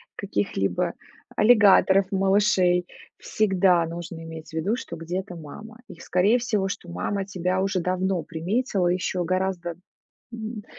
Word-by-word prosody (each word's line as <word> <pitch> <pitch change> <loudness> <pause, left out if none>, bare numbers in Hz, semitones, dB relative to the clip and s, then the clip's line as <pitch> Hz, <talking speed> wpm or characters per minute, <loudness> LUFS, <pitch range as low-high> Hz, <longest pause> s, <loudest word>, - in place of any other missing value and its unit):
каких-либо 95 -2 -1 0.4
аллигаторов, 200 -4 +5
малышей, 190 -2 +2 0.3
всегда 190 -4 +2
нужно 165 0 -7
иметь 160 -1 -9
в - - -16
виду, 170 +8 0
что 205 -8 -7
где-то 180 +3 -5
мама. 210 +8 -11
И, 170 - -11
скорее 195 +8 +2
всего, 210 -5 -1
что 200 - -6
мама 100 - -2
тебя 185 -1 -1
уже 195 -1 0
давно 185 0 -1
приметила, 180 - -1
ещё 180 0 0
гораздо 185 -1 -1 0.6
м, 220 -2 -6
185 Hz, 130 wpm, -25 LUFS, 170-200 Hz, 0.6 s, аллигаторов